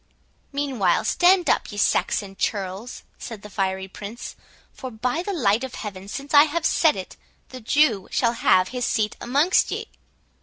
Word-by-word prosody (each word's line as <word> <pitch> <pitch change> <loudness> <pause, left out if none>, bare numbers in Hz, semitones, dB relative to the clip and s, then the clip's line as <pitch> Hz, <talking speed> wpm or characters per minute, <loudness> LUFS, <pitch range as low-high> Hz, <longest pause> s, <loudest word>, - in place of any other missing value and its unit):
"Meanwhile, 275 -7 0
stand 360 0 +4
up, - - +1
ye 205 - -8
Saxon 200 -1 0
churls," 195 +4 -4 0.2
said 220 -4 -8
the 210 - -11
fiery 190 0 -2
Prince; 205 +4 -8 0.4
"for, 260 - -7
by 250 +7 -2
the 405 - -4
light 235 - +1
of 260 - -6
Heaven, 195 -3 -7
since 275 +8 -7
I 290 +1 +8
have 315 +1 -2
said 315 -1 +3
it, 190 - -8 0.3
the 255 -1 -9
Jew 230 -5 +2
shall 235 -2 +1
have 185 -5 +3
his 250 -1 -4
seat 215 -2 0
amongst 285 +9 +2
ye!" - - -5
235 Hz, 165 wpm, -23 LUFS, 200-285 Hz, 0.4 s, I